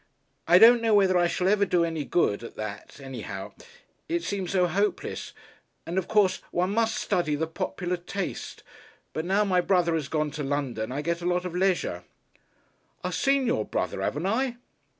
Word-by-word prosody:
I 175 +2 +7
don't 230 +4 +8
know 225 -2 +3
whether 190 -2 +4
I 175 -1 +4
shall 180 +1 -1
ever 205 +1 +3
do 175 -3 +2
any 160 -3 -3
good 115 -10 +1
at 115 - -9
that 110 +3 -7
anyhow. 120 -8 -7 0.6
It 340 +1 -1
seems 195 -3 -3
so 185 -2 +3
hopeless. 200 +5 -2 0.5
And, 175 +3 -1
of 180 - -5
course, 210 -4 +2
one 180 +2 0
must 225 +1 +1
study 155 -4 0
the 160 +2 -1
popular 165 +3 -3
taste. 180 +2 -5 0.5
But, 155 - -3
now 195 +3 +2
my 185 -2 +3
brother 175 -2 +2
has 155 -4 -1
gone 155 -1 -1
to 150 0 -5
London, 135 -5 -2
I 145 +3 -3
get 170 +1 -1
a 175 - -2
lot 180 0 0
of 180 - -4
leisure." 180 - 0 1.0
"I 180 - -2
seen 270 +9 +2
your 110 - +1
brother, - - -3
'aven't 150 +6 -2
I?" 240 +4 0
175 Hz, 185 wpm, -27 LUFS, 150-195 Hz, 1.0 s, don't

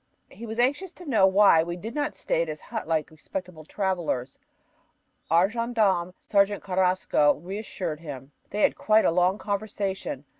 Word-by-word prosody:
He 235 - -9
was 220 +1 -6
anxious 285 +9 0
to 360 - -13
know 220 -10 +4
why 190 -4 +6
we 170 +1 -3
did 220 +6 -7
not 295 +1 -2
stay 165 - -1
at 170 - -1
his 155 -1 -5
hut 150 - -6
like 160 -1 -1
respectable 165 0 -7
travelers. 170 -10 -2 0.9
Our 170 +4 +5
gendarme, 210 -6 0
Sergeant 200 0 +1
Carrasco, 185 -5 +2
reassured 180 -2 -5
him. 140 -4 -9 0.2
They 210 - -3
had - - +3
quite 220 0 +3
a - - +4
long 180 +3 +2
conversation. 200 -8 -3
190 Hz, 160 wpm, -26 LUFS, 165-215 Hz, 0.9 s, why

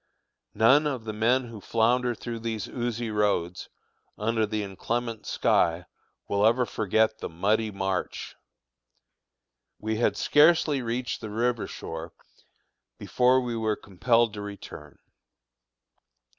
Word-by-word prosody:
None 135 +7 +5
of 130 -6 -3
the 110 -1 -5
men 120 +4 +2
who 110 -3 -9
flounder 120 +3 +1
through 115 +1 -6
these 110 -3 -4
oozy 120 -2 -3
roads, 100 -5 0 0.5
under 110 0 0
the 105 0 -2
inclement 115 +4 -4
sky, 85 +1 +2 0.4
will 100 0 +1
ever 120 +3 +4
forget 110 0 +1
the - - -5
"Muddy 105 +6 +1
March." 95 -2 -3 1.4
We 110 0 -2
had 120 - +1
scarcely 150 -2 +4
reached 120 +1 -3
the 110 - -6
river 120 +2 -1
shore 80 +1 -7 0.8
before 125 +1 +3
we 120 -2 -3
were 110 -1 0
compelled 115 +4 +1
to 105 - -6
return. 100 -7 -9
110 Hz, 120 wpm, -27 LUFS, 105-120 Hz, 1.4 s, None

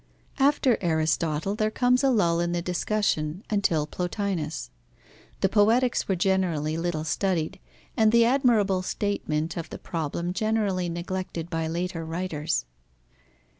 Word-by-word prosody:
After 270 -3 +3
Aristotle, 160 +1 0
there 215 +1 0
comes 250 +3 +2
a 270 - +4
lull 170 -9 +2
in 175 0 0
the 175 - 0
discussion, 180 -2 -1
until 175 -7 +2
Plotinus. 175 - -3 0.7
The - - +4
Poetics 225 +5 +3
were 190 - +1
generally 175 -5 +1
little 165 -2 -2
studied, 165 -1 -1 0.4
and 220 -1 +4
the 235 0 +5
admirable 230 -7 +3
statement 170 -5 -2
of 165 -1 -5
the - - -7
problem 170 +2 -3
generally 205 -4 0
neglected 175 0 -4
by 165 -1 -1
later 170 +1 -3
writers. 160 - -2
180 Hz, 130 wpm, -26 LUFS, 165-210 Hz, 0.7 s, the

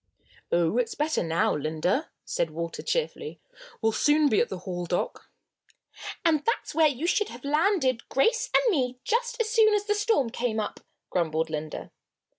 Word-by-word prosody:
"Oh, 170 +7 +2
it's 245 - -1
better 305 +1 0
now, 165 -1 +1
Linda," 155 - -1 0.2
said 165 - -1
Walter, 165 +2 -5
cheerfully. 470 -2 -2 0.4
"We'll 225 - +4
soon 295 +5 +3
be 215 - +3
at 240 - +1
the 190 - -4
Hall 175 -1 -5
dock." 175 - -3 1.0
"And 310 -3 +3
that's 460 - -1
where 315 +1 +5
you 285 +2 -2
should 415 +4 +1
have 240 +3 -10
landed 300 - +1
Grace 455 - +2
and - - +4
me 255 -7 0
just 480 +1 -1
as 440 -1 0
soon 440 -2 +5
as 410 0 -1
the 415 - +2
storm 415 - +1
came 235 -2 -1
up," 210 - -4 0.3
grumbled 160 -2 0
Linda. 155 0 -5
270 Hz, 170 wpm, -27 LUFS, -, 1.0 s, where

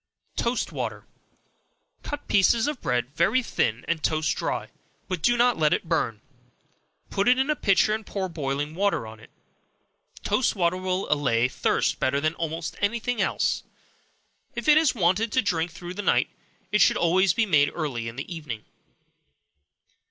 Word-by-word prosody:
Toast 235 +1 -1
Water. - - -4 1.0
Cut 290 -1 -5
slices 215 +3 +4
of 295 -3 -3
bread 125 +3 -1
very 205 +10 +2
thin, 115 - -1
and 170 -2 -1
toast 155 0 0
dry, - - -3 0.4
but 185 -5 -3
do 240 +5 +3
not 240 -4 +3
let 155 -1 +3
it - - -2
burn; 115 -10 -1 0.9
put 200 +2 0
it 250 +1 +5
in 265 +3 +1
a - - +1
pitcher, 210 -3 +3
and 220 +1 -3
pour 195 -2 -3
boiling 145 -2 -3
water 195 - 0
on 110 0 -10
it. 110 - -16 0.9
Toast 220 +4 +1
water 175 -2 +1
will 185 +1 -2
allay 125 -5 +2
thirst - - 0
better 140 +2 +1
than 155 +2 0
almost 165 0 -4
any 210 +3 +1
thing 245 0 -2
else. - - 0 0.9
If - - -4
it 300 - +7
is 310 -6 +2
wanted 200 +3 +2
to 255 - +4
drink 170 -4 0
through 175 +2 -8
the 205 - -4
night, - - +2 0.4
it 210 - +3
should - - +5
always 180 +1 +3
be 230 - +2
made 145 -7 +3
early 135 -8 -3
in 115 - -6
the 140 +7 -6
evening. 130 -9 -7
175 Hz, 170 wpm, -25 LUFS, 150-215 Hz, 1.0 s, it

